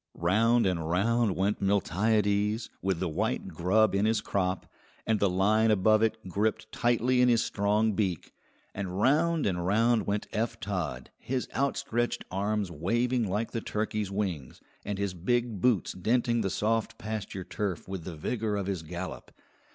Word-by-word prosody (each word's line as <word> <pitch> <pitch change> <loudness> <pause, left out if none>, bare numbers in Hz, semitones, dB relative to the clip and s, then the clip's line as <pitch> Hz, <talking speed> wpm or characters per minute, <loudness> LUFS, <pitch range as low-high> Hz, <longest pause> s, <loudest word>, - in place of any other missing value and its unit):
Round 115 +7 +3
and 85 -4 -1
round 110 +3 +2
went 100 +2 0
Miltiades, 105 +3 +1
with 95 -3 0
the 95 - -1
white 80 - -2
grub 105 +5 +2
in 100 +1 +2
his 110 0 +2
crop, 95 -3 -1 0.4
and 110 -2 +1
the 100 - +3
line 105 +5 +3
above 110 +1 +4
it 110 0 +2
gripped 105 +4 -1
tightly 120 +1 +2
in 125 - +5
his 115 -2 +3
strong 105 +2 +1
beak; 95 -6 -2 0.4
and 95 -1 -4
round 155 +7 +3
and 90 -3 0
round 110 +4 +2
went 100 +1 -1
Eph 110 +2 -1
Todd, 90 -9 -4
his 130 0 -3
outstretched 130 -2 -1
arms 100 0 -1
waving 120 +7 0
like 105 +4 -1
the 115 - -3
turkey's 105 -2 -2
wings, 95 -10 -3 0.2
and 100 -1 -3
his 100 -2 -2
big 115 +3 -1
boots 120 -7 +2
denting 115 +4 +1
the 100 - 0
soft 115 +4 -1
pasture 105 -3 -5
turf 100 -2 -4
with 95 -3 -5
the 85 -1 -6
vigour 105 +6 -2
of 100 -2 -2
his 95 -3 -2
gallop. 85 +3 -7
105 Hz, 160 wpm, -29 LUFS, 95-115 Hz, 0.4 s, in